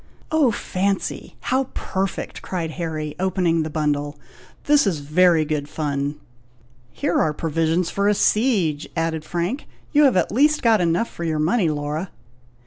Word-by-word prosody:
"Oh 310 Hz, -5 st, +4 dB
fancy! 195 Hz, -2 st, -2 dB, 0.2 s
how 265 Hz, +1 st, +2 dB
perfect!" 190 Hz, 0 st, -3 dB
cried 170 Hz, -4 st, -3 dB
Harry, 155 Hz, -3 st, -4 dB
opening 180 Hz, -3 st, +1 dB
the 155 Hz, -, -2 dB
bundle; 145 Hz, -1 st, -1 dB, 0.5 s
"this 290 Hz, -5 st, +4 dB
is 180 Hz, -5 st, +1 dB
very 160 Hz, +2 st, +3 dB
good 150 Hz, -1 st, -2 dB
fun!" 145 Hz, -1 st, -2 dB, 0.8 s
"Here -, -, 0 dB
are 155 Hz, -, +1 dB
provisions 165 Hz, +2 st, 0 dB
for 200 Hz, 0 st, 0 dB
a 210 Hz, -, +3 dB
siege!" 195 Hz, -, +1 dB
added 165 Hz, -1 st, -1 dB
Frank. 175 Hz, -, -3 dB, 0.2 s
"You 295 Hz, -1 st, +5 dB
have 255 Hz, -8 st, +4 dB
at -, -, +1 dB
least 295 Hz, +6 st, +3 dB
got 225 Hz, -4 st, +4 dB
enough 175 Hz, +6 st, +1 dB
for 170 Hz, -, -6 dB
your 160 Hz, -2 st, -1 dB
money, 170 Hz, +4 st, +2 dB
Laura!" 150 Hz, +4 st, -3 dB
170 Hz, 150 wpm, -22 LUFS, 155-200 Hz, 0.8 s, You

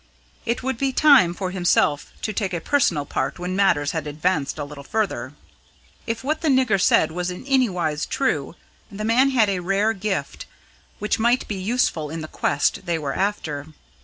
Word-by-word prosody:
It 235 Hz, +2 st, -1 dB
would 260 Hz, -3 st, -2 dB
be 275 Hz, -1 st, +1 dB
time 270 Hz, -, +6 dB
for 185 Hz, -1 st, -3 dB
himself 175 Hz, -5 st, +1 dB
to 215 Hz, -, -2 dB
take 195 Hz, -3 st, -2 dB
a -, -, -1 dB
personal 170 Hz, -, +1 dB
part -, -, -2 dB
when 180 Hz, +1 st, -4 dB
matters 145 Hz, -8 st, +2 dB
had 160 Hz, -3 st, -3 dB
advanced 150 Hz, 0 st, -1 dB
a 150 Hz, -, -3 dB
little 145 Hz, 0 st, -9 dB
further. 215 Hz, +6 st, -2 dB, 0.7 s
If 230 Hz, +2 st, -3 dB
what 305 Hz, +4 st, -1 dB
the 325 Hz, -, -1 dB
nigger 255 Hz, -8 st, +3 dB
said 160 Hz, -, +4 dB
was 180 Hz, +2 st, -3 dB
in 180 Hz, +7 st, -7 dB
any 265 Hz, -3 st, +3 dB
wise 155 Hz, -5 st, -2 dB
true, 160 Hz, -, -1 dB, 0.4 s
the 210 Hz, +1 st, -5 dB
man 250 Hz, +5 st, +4 dB
had 240 Hz, -5 st, +3 dB
a 195 Hz, -2 st, 0 dB
rare 195 Hz, +5 st, +1 dB
gift 190 Hz, -8 st, -4 dB, 0.5 s
which 210 Hz, +2 st, -1 dB
might 240 Hz, +3 st, +2 dB
be -, -, -3 dB
useful 185 Hz, -8 st, 0 dB
in 160 Hz, +1 st, -5 dB
the 155 Hz, -, -6 dB
quest 145 Hz, +1 st, -1 dB
they 170 Hz, -1 st, +1 dB
were 145 Hz, -3 st, -3 dB
after. 160 Hz, -8 st, -2 dB
190 Hz, 190 wpm, -23 LUFS, 160-230 Hz, 0.7 s, time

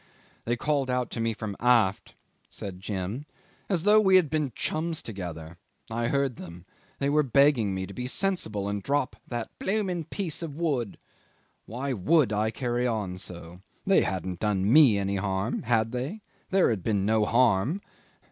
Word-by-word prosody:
"They 120 Hz, -, +1 dB
called 140 Hz, -1 st, 0 dB
out 125 Hz, -1 st, -1 dB
to -, -, -4 dB
me 115 Hz, 0 st, +1 dB
from 105 Hz, -2 st, -5 dB
aft," 115 Hz, -6 st, +2 dB, 0.3 s
said 95 Hz, -2 st, -7 dB
Jim, 100 Hz, +7 st, -4 dB, 0.4 s
"as 175 Hz, -5 st, 0 dB
though 210 Hz, +2 st, +6 dB
we 190 Hz, -2 st, +5 dB
had 170 Hz, -7 st, +4 dB
been 150 Hz, -4 st, 0 dB
chums 160 Hz, +1 st, -1 dB
together. 85 Hz, -6 st, -7 dB, 0.3 s
I 115 Hz, +1 st, -1 dB
heard 140 Hz, -2 st, 0 dB
them. 85 Hz, 0 st, -10 dB, 0.3 s
They 140 Hz, -, -1 dB
were 150 Hz, +2 st, +4 dB
begging 135 Hz, -7 st, +3 dB
me 95 Hz, 0 st, -3 dB
to 100 Hz, -, -10 dB
be 125 Hz, +5 st, -4 dB
sensible 125 Hz, -, -2 dB
and 100 Hz, 0 st, -2 dB
drop 140 Hz, +2 st, 0 dB
that 120 Hz, -2 st, -4 dB
'blooming 190 Hz, -5 st, -1 dB
piece 170 Hz, -1 st, -4 dB
of 160 Hz, -4 st, -5 dB
wood.' 140 Hz, -, -1 dB, 0.7 s
Why 130 Hz, +5 st, -3 dB
would 130 Hz, -, +3 dB
I 105 Hz, +1 st, +1 dB
carry 120 Hz, +1 st, -1 dB
on 100 Hz, -6 st, -2 dB
so? 85 Hz, -2 st, -9 dB, 0.3 s
They 195 Hz, -, +5 dB
hadn't 95 Hz, -1 st, -3 dB
done 105 Hz, 0 st, +1 dB
me 140 Hz, -9 st, +7 dB
any 100 Hz, 0 st, -1 dB
harm 95 Hz, +3 st, -1 dB
had 115 Hz, -2 st, +1 dB
they? 135 Hz, -, -4 dB, 0.3 s
There 190 Hz, -8 st, +3 dB
had 105 Hz, -5 st, -2 dB
been 100 Hz, -4 st, +1 dB
no 110 Hz, 0 st, +3 dB
harm. 120 Hz, -, +3 dB
120 Hz, 170 wpm, -27 LUFS, 100-145 Hz, 0.7 s, me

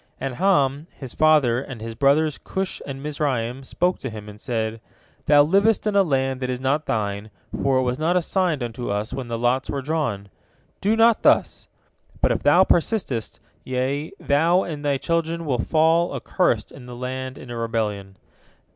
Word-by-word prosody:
And 135 Hz, -1 st, -3 dB
Ham, 150 Hz, -6 st, +2 dB
his 130 Hz, -4 st, -8 dB
father, 150 Hz, -6 st, +3 dB
and 135 Hz, -3 st, -8 dB
his 115 Hz, +1 st, -6 dB
brothers 145 Hz, +5 st, +2 dB
Cush 190 Hz, 0 st, -3 dB
and 135 Hz, 0 st, -6 dB
Mizraim 135 Hz, -5 st, -2 dB
spoke 180 Hz, +7 st, -1 dB
to 130 Hz, -, -5 dB
him, 105 Hz, -2 st, -9 dB
and 105 Hz, 0 st, -11 dB
said: 115 Hz, -2 st, -3 dB, 0.5 s
"Thou 145 Hz, 0 st, +7 dB
livest 200 Hz, +8 st, +2 dB
in 210 Hz, -1 st, 0 dB
a 200 Hz, -, +6 dB
land 135 Hz, -6 st, 0 dB
that 130 Hz, -1 st, -3 dB
is 125 Hz, -1 st, -2 dB
not 140 Hz, +4 st, 0 dB
thine, 105 Hz, -1 st, -2 dB, 0.3 s
for 135 Hz, -1 st, +2 dB
it 130 Hz, -, +2 dB
was 125 Hz, +2 st, -1 dB
not 170 Hz, +3 st, +2 dB
assigned 175 Hz, -5 st, 0 dB
unto 120 Hz, +1 st, -5 dB
us 105 Hz, +2 st, -2 dB
when 130 Hz, -3 st, -5 dB
the 115 Hz, -1 st, -3 dB
lots 125 Hz, +3 st, 0 dB
were 140 Hz, -1 st, -3 dB
drawn. 130 Hz, -10 st, -2 dB, 0.5 s
Do 210 Hz, +3 st, +2 dB
not 225 Hz, 0 st, +4 dB
thus! -, -, +2 dB, 0.5 s
But -, -, +2 dB
if -, -, -1 dB
thou 185 Hz, -, +5 dB
persistest, 170 Hz, -, 0 dB, 0.2 s
ye, 130 Hz, +4 st, -2 dB
thou 165 Hz, +6 st, +2 dB
and 150 Hz, -3 st, -6 dB
thy 140 Hz, -1 st, +1 dB
children, 165 Hz, +2 st, -1 dB
will 130 Hz, -5 st, -1 dB
fall, 160 Hz, +6 st, +2 dB
accursed, 120 Hz, -, 0 dB
in 125 Hz, -2 st, -12 dB
the 125 Hz, -, -8 dB
land, 130 Hz, +1 st, -5 dB
in 120 Hz, -, -10 dB
a -, -, -5 dB
rebellion. 105 Hz, -4 st, -3 dB
135 Hz, 180 wpm, -23 LUFS, 120-160 Hz, 0.5 s, Thou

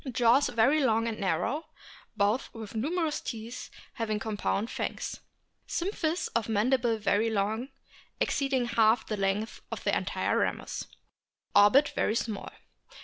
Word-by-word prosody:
Jaws 240 Hz, +4 st, +4 dB
very 270 Hz, +6 st, +3 dB
long 225 Hz, -2 st, +2 dB
and 225 Hz, -2 st, -3 dB
narrow; 200 Hz, -, -1 dB, 0.5 s
both 205 Hz, +5 st, +1 dB
with 220 Hz, -3 st, -8 dB
numerous 305 Hz, +7 st, -1 dB
teeth 230 Hz, +1 st, -6 dB, 0.2 s
having 215 Hz, -2 st, -1 dB
compressed 215 Hz, 0 st, -1 dB
fangs. -, -, -4 dB, 0.5 s
Symphysis 345 Hz, -2 st, -1 dB
of 230 Hz, -1 st, 0 dB
mandible 230 Hz, +2 st, +2 dB
very 215 Hz, +1 st, +2 dB
long, 220 Hz, +4 st, -1 dB, 0.5 s
exceeding 270 Hz, -3 st, +1 dB
half 225 Hz, -1 st, +3 dB
the 215 Hz, -, -2 dB
length 195 Hz, +2 st, -1 dB
of -, -, -5 dB
the -, -, +2 dB
entire -, -, 0 dB
ramus. -, -, -2 dB, 0.7 s
Orbit 210 Hz, +9 st, +6 dB
very 215 Hz, -, +1 dB
small. 220 Hz, -3 st, -3 dB
225 Hz, 130 wpm, -29 LUFS, 215-260 Hz, 0.7 s, Orbit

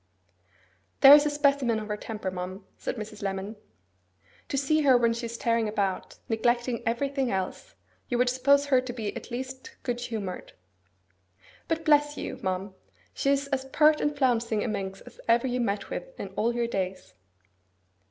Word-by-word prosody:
'There 275 Hz, 0 st, +11 dB
is 295 Hz, 0 st, +7 dB
a -, -, +2 dB
specimen 280 Hz, -6 st, +2 dB
of 215 Hz, -, -6 dB
her 210 Hz, -, -2 dB
temper, 210 Hz, -3 st, -5 dB
ma'am,' 185 Hz, +2 st, -6 dB
said -, -, -4 dB
Mrs. 215 Hz, -2 st, -7 dB
Lemon. 195 Hz, +2 st, -3 dB, 0.9 s
'To 275 Hz, -, -2 dB
see 310 Hz, +3 st, +2 dB
her 270 Hz, -4 st, +6 dB
when 235 Hz, -1 st, +2 dB
she 235 Hz, 0 st, -4 dB
is 235 Hz, +1 st, -6 dB
tearing 230 Hz, -1 st, +1 dB
about, 200 Hz, -3 st, -2 dB
neglecting 240 Hz, +1 st, 0 dB
everything 270 Hz, +2 st, 0 dB
else, 190 Hz, -, -4 dB, 0.3 s
you 245 Hz, -, 0 dB
would 250 Hz, +1 st, +3 dB
suppose 280 Hz, +3 st, +3 dB
her 265 Hz, -3 st, +3 dB
to 255 Hz, -1 st, -6 dB
be 220 Hz, -4 st, -4 dB
at -, -, -8 dB
least 260 Hz, +1 st, -6 dB
good 245 Hz, -2 st, -2 dB
humoured. 215 Hz, -6 st, -5 dB, 1.1 s
But 325 Hz, -1 st, -2 dB
bless 295 Hz, -1 st, +4 dB
you! -, -, -5 dB
ma'am, 190 Hz, 0 st, -2 dB, 0.4 s
she 275 Hz, -, 0 dB
is 280 Hz, 0 st, +2 dB
as 265 Hz, -1 st, -1 dB
pert 300 Hz, +3 st, +4 dB
and 295 Hz, 0 st, 0 dB
flouncing 230 Hz, -5 st, +1 dB
a -, -, -2 dB
minx 195 Hz, -3 st, -4 dB
as -, -, -15 dB
ever 235 Hz, +2 st, +4 dB
you 250 Hz, -1 st, -1 dB
met 200 Hz, -3 st, -2 dB
with -, -, -6 dB
in 195 Hz, -, -5 dB
all 225 Hz, +5 st, -1 dB
your 240 Hz, -1 st, +1 dB
days! 190 Hz, -, -4 dB
240 Hz, 175 wpm, -27 LUFS, 210-275 Hz, 1.1 s, There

